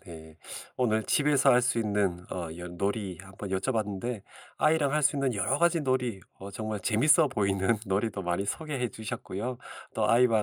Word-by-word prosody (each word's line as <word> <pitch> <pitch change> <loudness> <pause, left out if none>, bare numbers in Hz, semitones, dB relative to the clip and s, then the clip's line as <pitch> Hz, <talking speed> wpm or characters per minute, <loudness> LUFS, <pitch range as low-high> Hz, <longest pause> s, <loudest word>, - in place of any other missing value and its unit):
네. 80 -3 -11 0.4
오늘 110 -3 +1
집에서 145 +3 +3
할 125 0 +5
수 125 -1 +1
있는 100 -5 0
어 85 -3 -4
연 90 0 -8
놀이 100 -2 -2
한번 95 +1 -9
여쭤봤는데 105 +1 -2 0.4
아이랑 155 -3 +3
할 150 0 +1
수 145 +1 +3
있는 135 -4 0
여러 115 +9 0
가지 170 -1 +3
놀이 125 -7 -1 0.2
어 100 +1 -8
정말 110 +1 -4
재밌어 140 - +4
보이는 100 -2 +1
놀이도 100 0 -1
많이 90 +2 -1
소개해 135 +2 -2
주셨고요. 110 +2 -5 0.4
또 105 -1 +1
"아이와 115 -2 +4
110 Hz, 340 characters per minute, -28 LUFS, 95-130 Hz, 0.4 s, 할